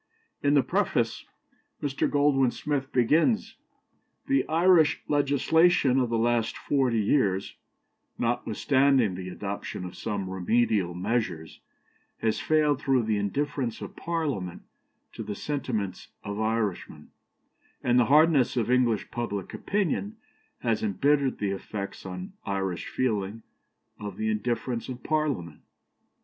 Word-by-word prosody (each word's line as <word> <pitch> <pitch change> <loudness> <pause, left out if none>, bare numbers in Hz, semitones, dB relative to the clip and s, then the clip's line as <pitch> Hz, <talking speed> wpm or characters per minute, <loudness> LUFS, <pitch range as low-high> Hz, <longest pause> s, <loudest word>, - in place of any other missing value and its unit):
In 145 +1 +3
the 140 - +5
preface - - 0 0.5
Mr. 140 -2 -1
Goldwin 140 -3 +3
Smith 145 -1 -3
begins: 155 - +2 0.7
"The 275 0 +1
Irish 165 -1 +4
legislation 145 0 +3
of 125 -2 +1
the 115 - 0
last 115 -1 +1
forty 130 -5 +1
years, 100 -4 +1 0.6
notwithstanding 120 0 +2
the 90 0 -6
adoption 100 0 -5
of 90 - -8
some 100 -3 -3
remedial 95 -1 +1
measures, 90 -5 -2 0.6
has 110 -1 0
failed 150 -3 +2
through 135 -3 +2
the 110 -1 0
indifference 130 +3 -2
of - - -8
Parliament 145 - -3 0.5
to - - -7
the 105 - -5
sentiments 110 -9 -3 0.2
of 100 0 -5
Irishmen; 110 -8 -2 0.7
and 125 0 +4
the 120 - +4
harshness 145 -2 +4
of 120 0 +1
English 120 -4 +2
public 105 -5 -4
opinion 205 +2 -1 0.4
has 115 -3 0
embittered 135 +6 +1
the 100 -2 -1
effects 100 0 -6
on 90 0 -7
Irish 95 -2 -2
feeling 110 -3 -2 0.6
of 105 -2 -6
the 110 0 0
indifference 120 +2 -2
of 125 -1 -7
Parliament. 140 - -1
120 Hz, 120 wpm, -27 LUFS, 100-145 Hz, 0.7 s, the